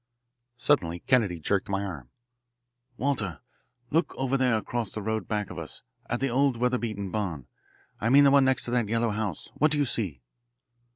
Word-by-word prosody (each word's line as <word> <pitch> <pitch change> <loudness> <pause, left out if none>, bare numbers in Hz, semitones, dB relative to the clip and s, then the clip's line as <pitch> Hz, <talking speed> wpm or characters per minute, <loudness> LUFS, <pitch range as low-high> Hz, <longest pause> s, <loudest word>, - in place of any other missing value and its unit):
Suddenly 85 - +1
Kennedy 105 -10 +2
jerked 100 +6 0
my 100 0 0
arm. 75 -11 -6 0.9
"Walter, 115 - -1 0.5
look 165 +3 +1
over 135 0 0
there 125 -4 +3
across 115 0 -3
the 110 - -5
road 110 +1 -2
back 105 -2 -2
of - - -6
us - - -7 0.3
at 120 - -1
the 135 - +1
old 130 0 +2
weatherbeaten 115 -5 -1
barn. 90 - -3 0.5
I 115 - 0
mean 140 +3 +7
the 140 - +6
one 140 -1 +6
next 130 0 +2
to 120 - -3
that 120 -4 +1
yellow 115 0 +1
house. 105 -5 -3
What 155 - +4
do 150 - +2
you 145 - +2
see?" 90 - -2
115 Hz, 180 wpm, -27 LUFS, 100-130 Hz, 0.9 s, mean